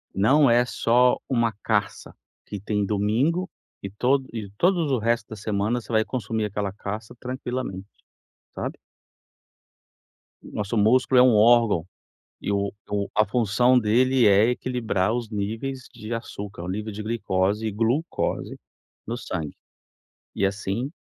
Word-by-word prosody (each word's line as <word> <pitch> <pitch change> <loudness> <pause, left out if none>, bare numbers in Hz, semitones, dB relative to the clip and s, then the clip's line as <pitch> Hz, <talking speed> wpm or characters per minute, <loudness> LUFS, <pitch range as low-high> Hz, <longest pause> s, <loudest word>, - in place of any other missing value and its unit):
Não 135 +9 +4
é 120 0 +5
só 125 0 +3
uma 115 -3 +1
caça 105 -2 -1 0.3
que 105 - -6
tem 105 +1 -1
domingo 115 - 0 0.3
e 100 - -5
tod 130 +6 +1
e 110 -3 -5
todos 175 -5 +2
o 130 - +2
resto 115 -1 0
da 110 - -7
semana 105 +3 -1
você 120 - -11
vai 110 -1 +3
consumir 110 -3 -2
aquela 100 -1 -3
caça 105 +3 -7
tranquilamente, 125 -6 -5 0.7
sabe. - - -5 1.7
Nosso 105 +2 -3
músculo 125 +4 +4
é - - +8
um 130 -2 +5
órgão 110 -5 +4 0.5
e - - -2
o 100 0 0
e - - -18 0.2
o 100 -1 -1
a 110 +1 +4
função 120 +3 +3
dele 125 +3 +3
é 100 +3 +5
equilibrar 120 -5 -1
os 120 -2 -3
níveis 115 +5 -4
de 115 0 -6
açúcar, 100 -5 -6
o - - -6
nível 105 +4 -4
de 105 +1 -6
glicose 105 -1 0
e - - -2
glucose 115 - -1 0.5
no - - -4
sangue. - - -5 0.8
E, - - 0
assim 100 +6 -3
110 Hz, 145 wpm, -24 LUFS, 105-125 Hz, 1.7 s, é